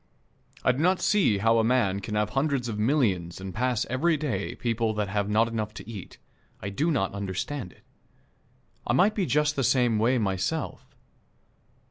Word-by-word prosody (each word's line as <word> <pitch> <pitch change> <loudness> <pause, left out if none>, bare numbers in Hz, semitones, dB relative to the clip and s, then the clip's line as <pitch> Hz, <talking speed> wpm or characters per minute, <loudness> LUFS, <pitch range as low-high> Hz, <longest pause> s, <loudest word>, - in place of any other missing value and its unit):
I - - +4
do 125 - -4
not 180 +4 +3
see 190 - +3
how 115 +3 +3
a - - +3
man 110 -5 +2
can 105 +2 -5
have 105 0 0
hundreds 135 -1 0
of 105 -2 -4
millions 105 - +1
and 95 -1 -6
pass 125 0 0
every 155 +6 +1
day 125 -10 -3
people 115 -2 -1
that 105 -2 -1
have 100 0 -1
not 110 +2 +3
enough 110 -2 -4
to - - -9
eat. 105 -6 -9 0.4
I 100 - -5
do 145 +12 0
not 115 - 0
understand 100 +4 -4
it. - - -23 1.0
I - - +2
might 190 - +4
be 195 -5 -1
just 150 +1 +2
the 135 - 0
same 120 -2 +3
way 120 +4 +3
myself. 105 - -2
115 Hz, 180 wpm, -27 LUFS, 100-135 Hz, 1.0 s, I